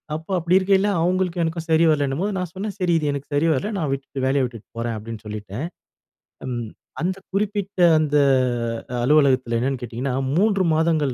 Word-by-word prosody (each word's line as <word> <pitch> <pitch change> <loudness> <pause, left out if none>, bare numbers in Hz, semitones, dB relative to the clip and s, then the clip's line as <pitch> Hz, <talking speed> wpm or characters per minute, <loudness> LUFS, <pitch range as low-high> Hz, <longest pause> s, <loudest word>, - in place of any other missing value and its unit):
அப்போ 160 +4 -7
அப்படி 175 +2 +3
இருக்கையில, 195 +1 +2
அவங்களுக்கும் 180 0 +1
எனக்கும் 165 0 -4
சரி 160 +1 +4
வரலன்னும்போது 150 +7 0
நான் 180 -2 -3
சொன்னே, 200 +3 -4
"சரி 180 -2 +1
இது 150 - -1
எனக்கு 140 0 -5
சரி 160 +3 +2
வரல, 180 +10 -2
நான் 155 -6 -1
விட்டுட்டு 135 -1 -4
வேலைய 135 0 +2
விட்டுட்டு 115 -4 -9
போறேன்" 115 0 -2
அப்டின்னு 110 0 -8
சொல்லிட்டேன். 105 +4 -5 0.8
ம் 120 -2 -3 0.4
அந்த 185 +2 0 0.2
குறிப்பிட்ட 200 -1 -2 0.2
அந்த 150 -1 +1 0.9
அலுவலகத்துல 130 -4 +3
என்னன்னு 130 +1 -1
கேட்டீங்கனா, 125 +3 -3 0.2
3 200 -2 +3
மாதங்கள் 155 -4 +1
155 Hz, 160 wpm, -22 LUFS, 130-180 Hz, 0.9 s, சரி